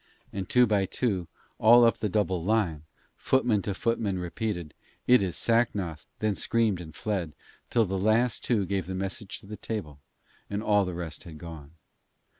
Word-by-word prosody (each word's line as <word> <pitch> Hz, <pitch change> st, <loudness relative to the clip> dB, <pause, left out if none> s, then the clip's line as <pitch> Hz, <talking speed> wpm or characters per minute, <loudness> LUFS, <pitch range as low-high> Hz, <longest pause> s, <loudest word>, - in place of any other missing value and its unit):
And 95 Hz, -2 st, -4 dB
two 125 Hz, 0 st, +6 dB
by 100 Hz, -4 st, +1 dB
two, 95 Hz, -8 st, -1 dB, 0.3 s
all 120 Hz, +2 st, +7 dB
up 115 Hz, -, +3 dB
the 105 Hz, -, -1 dB
double 95 Hz, -4 st, 0 dB
line, 90 Hz, -7 st, 0 dB, 0.3 s
footman 125 Hz, -6 st, +2 dB
to 100 Hz, 0 st, -3 dB
footman 110 Hz, -3 st, 0 dB
repeated, 90 Hz, -3 st, -3 dB, 0.3 s
'It 125 Hz, -3 st, +6 dB
is 95 Hz, -3 st, -1 dB
Sacnoth,' 105 Hz, -9 st, 0 dB
then 110 Hz, -1 st, 0 dB
screamed 110 Hz, -3 st, +1 dB
and 80 Hz, -2 st, -10 dB
fled, 95 Hz, -8 st, -2 dB, 0.4 s
till 115 Hz, -2 st, +3 dB
the 95 Hz, 0 st, -2 dB
last 110 Hz, +4 st, +2 dB
two 110 Hz, -6 st, +1 dB
gave 95 Hz, -2 st, -2 dB
the 95 Hz, -, -4 dB
message 95 Hz, +2 st, -4 dB
to -, -, -16 dB
the 105 Hz, +1 st, -8 dB
table, 95 Hz, -10 st, -5 dB, 0.5 s
and 100 Hz, +1 st, -3 dB
all 105 Hz, -2 st, +3 dB
the 90 Hz, -1 st, -4 dB
rest 85 Hz, -2 st, -6 dB
had 80 Hz, -3 st, -9 dB
gone. 80 Hz, -2 st, -10 dB
100 Hz, 175 wpm, -28 LUFS, 90-110 Hz, 0.5 s, all